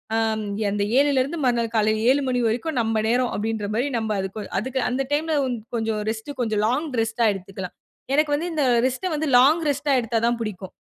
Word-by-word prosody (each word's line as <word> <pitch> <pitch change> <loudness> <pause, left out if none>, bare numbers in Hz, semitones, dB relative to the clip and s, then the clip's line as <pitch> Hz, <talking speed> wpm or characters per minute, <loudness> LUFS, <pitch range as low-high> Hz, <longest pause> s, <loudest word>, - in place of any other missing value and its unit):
ஆம், 220 -1 0 0.3
அந்த 205 0 0
7ல 280 -1 +4
இருந்து 295 +6 -5
மறுநாள் 235 -2 +1
காலையில 215 0 +2
7:00 275 +2 +4
மணி 250 -1 +1
வரைக்கும் 250 +7 -2
நம்ம 225 -1 0
நேரம், 245 +1 +1
அப்பிடின்றமாரி 220 +3 -1
நம்ப 220 -1 -2
அதுக்கு 195 +2 -6
அதுக்கு 260 +5 -3
அந்த 255 +2 -1
டைம்ல 315 +2 0 0.4
கொஞ்சம் 225 -2 -1
ரெஸ்ட் 220 +4 -5
கொஞ்சம் 215 -3 0
லாங் 275 +7 0
ரெஸ்ட்டா 225 +1 0
எடுத்துக்கலாம். 190 -1 -8 0.4
எனக்கு 300 0 +2
வந்து 325 +4 -2
இந்த 305 -2 +1 0.2
ரெஸ்ட 260 +9 -3
வந்து 310 +1 -1
லாங் 300 +7 +5
ரெஸ்ட்டா 285 +1 0
எடுத்தா 230 0 -1
தான் 240 0 +1
பிடிக்கும். 195 -4 -5
235 Hz, 180 wpm, -23 LUFS, 220-280 Hz, 0.4 s, லாங்